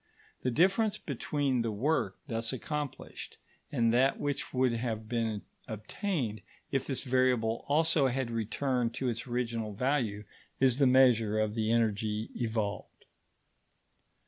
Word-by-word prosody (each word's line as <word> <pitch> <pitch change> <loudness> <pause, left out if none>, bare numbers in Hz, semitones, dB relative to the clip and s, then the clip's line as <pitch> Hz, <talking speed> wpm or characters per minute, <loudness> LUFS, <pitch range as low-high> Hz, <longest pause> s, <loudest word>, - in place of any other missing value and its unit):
The 125 - 0
difference 195 - +3
between 140 -2 -1
the 115 - -1
work 140 +10 0
thus 115 -2 -2
accomplished 145 +2 -5 0.3
and 115 -4 +2
that 130 +3 +3
which 145 -1 -2
would 130 -2 +2
have 115 -2 -3
been 110 -3 -1 0.2
obtained 110 - -3 0.3
if 135 -2 0
this 135 - -1
variable 125 -4 +1
also 155 -1 +3
had 130 -1 -1
returned 115 +2 -1
to 130 - -1
its 115 +2 -4
original 115 -3 -2
value, 120 -4 0 0.4
is 130 0 +3
the 140 - +5
measure 120 -5 +5
of 110 -1 +1
the 110 0 0
energy 110 -1 0
evolved. 110 -3 -3
120 Hz, 130 wpm, -31 LUFS, 110-135 Hz, 0.4 s, the